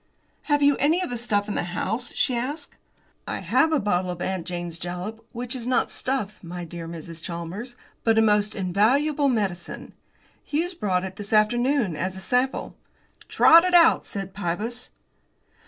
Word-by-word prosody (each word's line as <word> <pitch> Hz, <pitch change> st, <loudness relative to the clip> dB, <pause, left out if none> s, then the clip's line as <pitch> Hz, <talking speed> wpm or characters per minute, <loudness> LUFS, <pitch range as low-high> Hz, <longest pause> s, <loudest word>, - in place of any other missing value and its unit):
"Have 290 Hz, 0 st, +3 dB
you 285 Hz, 0 st, +5 dB
any 310 Hz, +5 st, +3 dB
of 250 Hz, -, -4 dB
the -, -, -2 dB
stuff 205 Hz, -3 st, 0 dB
in 210 Hz, -, -2 dB
the -, -, 0 dB
house?" 200 Hz, +7 st, -3 dB
she 255 Hz, -, +2 dB
asked. 285 Hz, +5 st, -4 dB, 0.5 s
"I -, -, -3 dB
have 320 Hz, 0 st, +2 dB
a 310 Hz, -, +3 dB
bottle 185 Hz, -4 st, 0 dB
of 175 Hz, -1 st, -4 dB
'Aunt 185 Hz, -1 st, -3 dB
Jane's 175 Hz, -2 st, -5 dB
Jalap,' 180 Hz, +5 st, -5 dB
which 245 Hz, +2 st, -5 dB
is 245 Hz, -2 st, -5 dB
not 250 Hz, -1 st, +1 dB
stuff, 235 Hz, -7 st, -3 dB
my 175 Hz, 0 st, -6 dB
dear 165 Hz, 0 st, -7 dB
Mrs. 165 Hz, 0 st, -8 dB
Chalmers, 180 Hz, +9 st, -6 dB, 0.3 s
but 225 Hz, -1 st, +3 dB
a -, -, +6 dB
most 210 Hz, 0 st, +2 dB
invaluable 260 Hz, -, +2 dB
medicine. 195 Hz, -8 st, -3 dB, 0.5 s
Hughes 335 Hz, +5 st, -1 dB
brought 190 Hz, -, 0 dB
it 190 Hz, 0 st, -6 dB
this 205 Hz, -1 st, -7 dB
afternoon 235 Hz, -, +2 dB
as 185 Hz, +4 st, -3 dB
a -, -, -6 dB
sample." 250 Hz, +7 st, -1 dB, 0.5 s
"Trot 335 Hz, +1 st, +7 dB
it 365 Hz, -1 st, +2 dB
out," 335 Hz, -1 st, +6 dB
said 195 Hz, -2 st, -6 dB
Pybus. 205 Hz, +6 st, -4 dB
210 Hz, 170 wpm, -25 LUFS, 180-255 Hz, 0.5 s, Trot